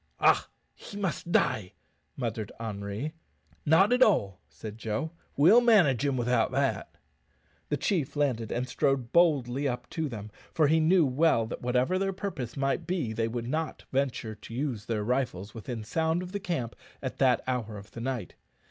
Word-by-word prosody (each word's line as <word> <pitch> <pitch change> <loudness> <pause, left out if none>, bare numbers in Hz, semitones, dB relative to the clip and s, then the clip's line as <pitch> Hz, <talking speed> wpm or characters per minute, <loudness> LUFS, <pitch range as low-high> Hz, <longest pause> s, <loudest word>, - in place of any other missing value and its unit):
"Ha! - - +3 0.2
he 205 - -10
must 185 -3 -3
die," 100 - +1 0.4
muttered 115 -4 -3
Henri. 105 +6 -4 0.5
"Not 190 +9 +5
at 250 - +2
all," 100 - +3
said 110 0 -9
Joe; 115 +9 -2 0.3
"we'll 185 - +7
manage 180 - +4
him 140 -2 +1
without 120 -1 +1
that." - - -1 0.7
The - - 0
chief 160 -9 -1
landed 125 -7 0
and 125 +1 -1
strode 130 -2 0
boldly 145 -6 +3
up 125 -1 -3
to 160 -2 -2
them, 105 -3 -7 0.2
for 155 - +4
he 160 +2 +4
knew 165 +1 +4
well 130 -3 +3
that 110 - -6
whatever 125 +9 +1
their 195 0 0
purpose 160 - -5
might 135 0 0
be 165 -11 -1
they 115 0 0
would 115 0 -4
not 155 +4 -3
venture 130 -5 -1
to 110 +2 -10
use 125 -6 -2
their 110 -2 -1
rifles 120 -5 -1
within 115 0 -6
sound 160 +8 0
of 180 - -8
the 205 - -3
camp 170 - -3 0.3
at 130 - -4
that 130 -3 +3
hour 120 -5 -2
of 100 +1 -12
the 115 - -8
night. 120 -7 -3
130 Hz, 175 wpm, -29 LUFS, 115-160 Hz, 0.7 s, we'll